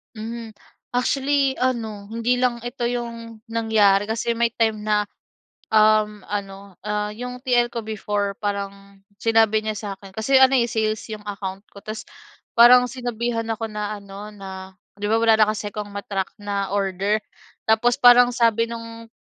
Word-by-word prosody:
Mhm, 225 +1 -6 0.4
actually 270 +2 +1
ano 230 -6 -2
hindi 230 +2 +1
lang 245 -1 +1
ito 245 0 -6
'yong 235 -2 -4
nangyari 220 -3 +3
kasi 225 +2 -1
may 235 0 +1
time 220 -2 0
na, 210 -1 +1 0.7
um, 215 -1 +4
ano, 195 -1 -6
ah, 210 0 -1
'yong 250 +3 -7
TL 240 -2 +2
ko 235 - -3
before 205 -2 -3
parang 200 -1 -5 0.2
sinabi 220 -1 +3
niya 215 - -1
sa 210 0 -6
akin 195 0 -14
kasi 220 +6 +2
ano 265 0 +6 0.2
sales 220 -2 -1
'yong 210 -1 -7
account 195 -1 -6
ko. 200 - -12
'Tas 215 +1 -7 0.5
parang 245 +2 +8
sinabihan 240 -2 -3
ako 225 0 -2
na 210 -1 -4
ano 200 +1 -9
na 190 -2 -10 0.2
'di 205 - -1
ba 220 - +3
wala 225 0 +4
na 215 - +5
kasi 210 -1 -4
akong 210 -2 -5
ma-track 200 -1 -3
na 200 -1 -3
order. 195 +1 0 0.5
Tapos 235 +3 +3
parang 245 -2 +7
sabi 230 -1 +2
no'ng 230 0 -8
220 Hz, 155 wpm, -23 LUFS, 205-235 Hz, 0.7 s, parang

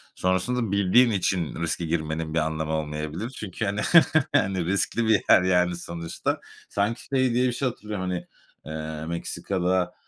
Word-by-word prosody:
Sonrasında 95 +5 0
bildiğin 100 +5 +4
için 90 -4 -1
riske 85 +1 -1
girmenin 80 -1 -2
bir 80 - +2
anlamı 80 0 -2
olmayabilir 75 +6 -3
çünkü, 110 -5 -5
hani, 100 +1 -1 0.5
hani, 95 -2 +2
riskli 100 +5 0
bir 110 -3 +4
yer, - - +8
yani, 90 -1 +2
sonuçta. 85 -1 -4 0.3
Sanki 105 +4 -1
şey 130 -3 +1
diye 125 +1 +3
bir 125 - -1
şey 130 +2 -1
hatırlıyorum, 105 -5 -5
hani, 90 -1 -4 0.4
eee, 80 0 -5
Meksika'da, 90 +2 -1
90 Hz, 150 wpm, -25 LUFS, 80-105 Hz, 0.5 s, yer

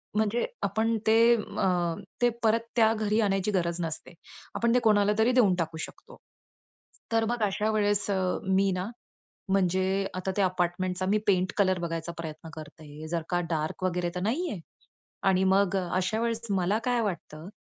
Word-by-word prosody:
म्हणजे 220 +2 +1 0.2
आपण 225 +1 +1
ते 230 +2 +6
अ, 180 -5 -1 0.3
ते 240 - +5
परत 225 +1 +4 0.2
त्या 225 -2 +5
घरी 215 0 0
आणायची 195 0 +1
गरज 175 -2 -1
नसते. 160 +1 -5 0.4
आपण 235 0 +2
ते 250 - +5
कोणाला 210 -1 +4
तरी 225 +3 +4
देऊन 215 -8 +4
टाकू 160 -1 -2
शकतो. - - -16 0.9
तर 225 0 +2
मग 240 -2 -1
अशा 210 +2 0
वेळेस 205 -1 +1
अ, 195 - +1 0.3
मी 190 0 +2
ना, 185 +4 -3 0.6
म्हणजे 190 +1 +1
आता 185 +1 -2
त्या 200 -2 +3
अपार्टमेंटचा 180 +1 -1
मी 210 - +3
पेंट 185 -2 +2
कलर 185 -3 +2
बघायचा 165 0 -3
प्रयत्न 160 0 -7
करते. 155 0 -10
जर 170 -1 -1
का 175 -1 +1
डार्क 155 +2 -2
वगैरे 180 -1 0
तर 180 - -2
नाही 295 - -1
आहे. 190 - -5 0.7
आणि 190 0 +3
मग 195 0 +3
अशा 185 +4 -1
वेळेस 230 -1 -1
मला 195 +2 +1
काय 245 -1 +1
वाटतं, 170 -5 -5
190 Hz, 165 wpm, -28 LUFS, 175-215 Hz, 0.9 s, ते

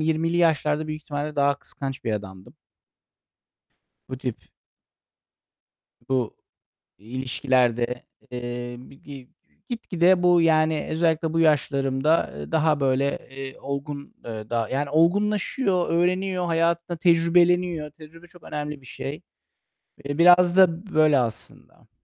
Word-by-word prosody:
20'li 160 +2 0
yaşlarda 155 -2 +1
büyük 155 0 -6
ihtimalle 145 +1 -5
daha 140 0 +3
kıskanç 135 -3 -7
bir 110 - -1
adamdım. 95 -3 -7 1.5
Bu 130 -1 -6
tip 125 -4 -4 1.7
bu 130 -4 -1 0.6
ilişkilerde, 125 +1 0 0.3
eee, 120 0 -5
bir 130 +2 -14
gi 135 -3 -12 0.4
gitgide 185 -6 +1
bu, 175 -1 +5
yani, 155 -1 +2
özellikle 160 0 0
bu 165 - +1
yaşlarımda, 140 0 +1
eee, 75 - -8
daha, 155 -2 +2
böyle, 135 +1 +1
eee, 135 0 -8
olgun, 140 +1 -6
eee, 110 -2 -7
daha 115 -2 -1
yani, 140 +2 -2
olgunlaşıyor, 195 - +1
öğreniyor, 180 +2 0
hayatında 170 +1 0
tecrübeleniyor. 170 -1 +2
Tecrübe 165 +3 -15
çok 175 -1 -18
önemli 150 -1 -5
bir 130 - -18
şey. 140 +4 -7 0.8
Eee, 145 +1 -3
biraz 175 +1 +6
da 185 +1 +3
böyle, 155 -3 +5
aslında. 115 -3 -6
150 Hz, 115 wpm, -24 LUFS, 135-170 Hz, 1.7 s, biraz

